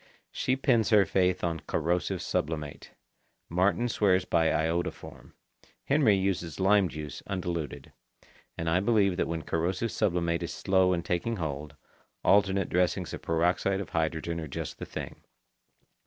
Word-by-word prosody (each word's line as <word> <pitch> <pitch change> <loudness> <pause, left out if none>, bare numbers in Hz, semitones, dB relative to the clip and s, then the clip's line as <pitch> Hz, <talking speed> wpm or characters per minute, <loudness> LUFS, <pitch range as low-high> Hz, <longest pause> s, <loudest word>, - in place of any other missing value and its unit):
She 130 - 0
pins 125 -5 +2
her 105 -3 +6
faith 90 -1 +1
to 85 -2 -1
corrosive 90 +3 -1
sublimate. 75 -2 -3 0.6
Martin 95 +7 +2
swears 95 -5 +2
by 80 -2 +2
iodoform. 80 +3 -2 0.5
Henry 135 -7 +4
uses 95 -4 -2
lime 95 -1 +4
juice 75 -3 -7
undiluted. 85 -5 -4 0.6
And 80 - -3
I 85 +2 +3
believe 100 -2 +2
that - - 0
when 80 -1 -3
corrosive 90 +9 -1
sublimate 85 -2 0
is - - -4
slow 95 -1 +2
in 85 -1 -1
taking 95 +6 -1
hold, 75 -4 -5 0.5
alternate 95 -1 +3
dressings 90 0 0
of - - -6
peroxide 90 +4 +1
of 100 - -5
hydrogen 80 +1 -1
are 80 - -5
just 70 - -6
the - - -6
thing. - - -7
90 Hz, 140 wpm, -28 LUFS, 80-100 Hz, 0.6 s, her